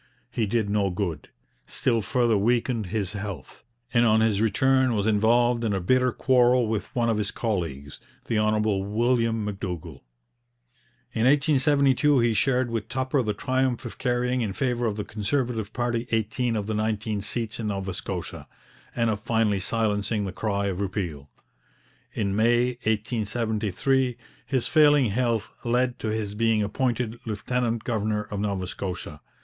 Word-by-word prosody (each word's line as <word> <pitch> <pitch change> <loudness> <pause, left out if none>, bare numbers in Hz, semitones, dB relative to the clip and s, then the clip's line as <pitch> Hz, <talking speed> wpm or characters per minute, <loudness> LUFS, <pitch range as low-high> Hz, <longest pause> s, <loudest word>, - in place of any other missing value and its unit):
He 110 -3 0
did 110 0 0
no 100 -1 +1
good, 90 -5 -3 0.4
still 115 -3 +1
further 115 +2 +1
weakened 115 +1 +1
his 100 0 -2
health, 100 -9 -7 0.3
and 120 -1 +4
on 110 -1 +4
his 110 -2 +2
return 130 +3 +3
was 100 -1 0
involved 115 +3 +3
in 110 -3 0
a 95 - 0
bitter 125 +7 +2
quarrel 125 -2 +3
with 110 -1 -2
one 120 -1 +1
of 115 -2 +1
his 105 -1 -1
colleagues, 80 - -3 0.3
the 115 -2 0
Hon. 110 0 +2
William 110 +2 +1
M'Dougall. 90 -6 -5 1.1
In 115 +2 +2
1872 140 0 +3
he 120 -2 +3
shared 125 +3 +1
with 115 -3 -3
Tupper 130 +1 0
the 105 -3 -2
triumph 130 +1 0
of - - -8
carrying 125 0 0
in 105 -4 -2
favour 120 0 0
of 105 - -1
the 105 - -2
Conservative 110 0 -2
party 120 -1 -2
eighteen 115 +2 0
of 105 -2 -2
the 110 - -2
nineteen 110 0 -1
seats 115 +2 -3
in 110 - -2
Nova 95 -2 -3
Scotia, - - -6 0.5
and 115 -2 +2
of 105 - -2
finally 110 -2 +1
silencing 105 0 0
the 95 - -4
cry 100 -1 -1
of 95 -1 -2
repeal. 90 -8 -4 0.8
In 100 -3 -1
May 120 +3 +3 0.2
1873 110 +3 0 0.3
his 130 -4 0
failing 145 -6 +5
health 115 -2 0
led 125 +1 0
to - - -3
his 110 -2 -2
being 110 0 +2
appointed 120 +1 -1
lieutenant 115 +2 -1
governor 110 -2 -1
of 105 -1 -6
Nova 100 -2 -1
Scotia. 90 -5 -6
110 Hz, 155 wpm, -25 LUFS, 105-120 Hz, 1.1 s, failing